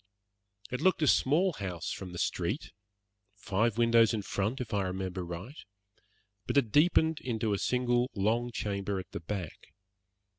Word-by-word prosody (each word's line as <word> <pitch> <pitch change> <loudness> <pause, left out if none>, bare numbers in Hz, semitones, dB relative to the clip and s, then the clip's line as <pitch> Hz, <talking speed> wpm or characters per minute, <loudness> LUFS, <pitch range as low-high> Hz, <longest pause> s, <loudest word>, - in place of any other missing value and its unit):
It 125 - -3
looked 185 -4 +3
a - - +3
small 165 +9 +3
house 90 - -4
from 95 -2 -6
the 90 - -7
street, - - -2 0.6
five 105 +2 0
windows 115 -1 +5
in 105 - -3
front, 105 +7 -2
if 120 -4 -5
I 100 - +2
remember 95 0 -3
right, 90 - -7 0.8
but - - 0
it 120 -6 +3
deepened 160 - +4
into 110 -4 -1
a 100 - -1
single 125 0 +1
long 115 +5 +1
chamber 100 -3 -2
at 95 - -9
the - - -5
back. 90 0 -6
110 Hz, 155 wpm, -30 LUFS, 95-125 Hz, 0.8 s, windows